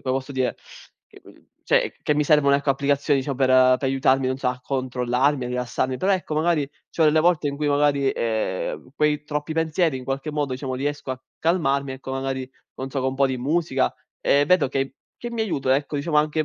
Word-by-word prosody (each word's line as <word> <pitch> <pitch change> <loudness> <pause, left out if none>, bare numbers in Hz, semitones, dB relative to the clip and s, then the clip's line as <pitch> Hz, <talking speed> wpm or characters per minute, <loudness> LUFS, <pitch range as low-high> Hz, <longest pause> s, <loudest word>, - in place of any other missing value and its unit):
posso 130 +1 -2
dire, 130 -2 -1 0.5
e - - -17
quin - - -19 0.2
cioè, - - +2
c - - -34
che 150 - +1
mi 150 - +2
servono, 145 -2 +4
ecco, 140 0 +1
applicazioni 140 +1 +1
diciamo 135 0 -3
per 130 -1 +2
uhm, 130 0 +6
per 135 - -1
aiutarmi, 135 0 +2
non 130 - -1
so, 135 - -3
a 125 0 -1
controllarmi, 130 +1 0
a - - -4
rilassarmi, 125 +1 -2
però 190 +8 +1
ecco, 180 -5 -2
magari, 155 -3 +1 0.2
c'ho 165 - -1
delle 155 0 +4
volte 160 -2 +3
in 140 - -4
cui 150 +1 -2
magari, 145 -1 +2
ehm, 110 0 -2
quei 150 0 +1
troppi 150 +1 -3
pensieri 160 -1 +1
in 130 - -8
qualche 135 +4 -3
modo, 145 -3 -2
diciamo, 130 0 -4
riesco 145 0 -3
a 130 -1 -4 0.2
calmarmi, 140 -5 +1
ecco 130 0 -8
magari, 135 -1 -3 0.3
non 135 +1 -5
so, 135 - -2
con 130 - 0
un 130 - -3
po' 140 0 +4
di 130 -1 -2
musica 140 0 0 0.3
e 145 +1 +3
vedo 180 -4 +4
che 135 0 -2 0.2
che 240 - -6
mi 235 -1 -3
aiuta, 140 -11 +1
ecco 145 +1 -2
diciamo 150 +2 -1
anche, 155 +1 +2
140 Hz, 220 wpm, -23 LUFS, 130-150 Hz, 0.5 s, uhm